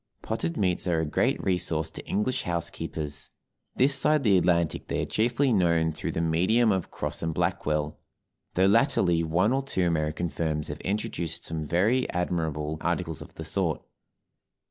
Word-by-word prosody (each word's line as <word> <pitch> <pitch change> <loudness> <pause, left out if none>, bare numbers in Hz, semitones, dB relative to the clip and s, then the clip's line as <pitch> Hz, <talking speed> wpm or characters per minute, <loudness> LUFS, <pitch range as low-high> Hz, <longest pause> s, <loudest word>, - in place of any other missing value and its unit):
Potted 80 +1 -2
meats 90 -3 0
are 85 -2 +2
a 80 - 0
great 75 - +1
resource 80 -4 0
to - - -8
English 105 +5 0
housekeepers; 80 -3 -4 0.5
this 135 +2 +4
side 145 +2 +3
the 105 -5 +5
Atlantic 85 -2 +2
they - - -1
are - - -1
chiefly 120 +4 +1
known 85 -4 +3
through 80 - -4
the - - -1
medium 95 +8 +3
of 95 -3 -1
Cross - - -4
& 80 - -1
Blackwell, 75 -4 -1 0.6
though 95 - +4
latterly 95 - +3
one 90 +8 +2
or 135 - +1
two 115 -10 -1
American 80 0 0
firms 80 -2 -2
have - - -6
introduced 85 -5 -3
some 80 -2 -4
very 110 - +2
admirable 80 -3 -2
articles 85 -3 -2
of - - -11
the - - -7
sort. - - 0
85 Hz, 165 wpm, -27 LUFS, 80-100 Hz, 0.6 s, the